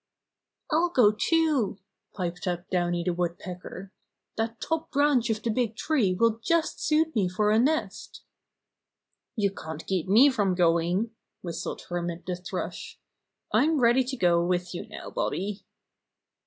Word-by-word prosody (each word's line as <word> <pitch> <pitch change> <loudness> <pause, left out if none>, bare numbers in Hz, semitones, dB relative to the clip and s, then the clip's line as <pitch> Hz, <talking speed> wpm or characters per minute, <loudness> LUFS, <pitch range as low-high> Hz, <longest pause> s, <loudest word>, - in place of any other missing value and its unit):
"I'll 335 +3 +3
go 245 -10 +5
too," 290 - +1 0.4
piped 180 -1 -4
up 175 0 -2
Downy 175 -1 0
the 180 0 0
Wood 175 0 -2
pecker. 180 +1 -8 0.4
"That 225 +1 -2
top 325 0 -2
branch 280 -4 +2
of 220 -1 -1
the 230 - 0
big 225 -1 -1
tree 235 -9 +1
will 230 +2 +2
just 335 -1 +1
suit 320 +1 +1
me 195 -5 +2
for 210 +3 +1
a 215 - +4
nest" 310 +6 -1 1.1
"You 200 -4 +1
can't 160 -4 -8
keep 185 -3 -1
me 240 +9 +6
from 200 -7 +1
going," 175 +5 +2 0.3
whistled 170 -2 -5
Hermit 175 0 -4
the 180 - -2
Thrush. 180 +1 -6 0.5
"I'm 310 0 +3
ready 240 +1 +4
to 265 +1 -4
go 170 -4 +3
with 180 0 -1
you 175 - -6
now, - - -9
Bobby." 200 +2 -3
205 Hz, 150 wpm, -27 LUFS, 180-255 Hz, 1.1 s, me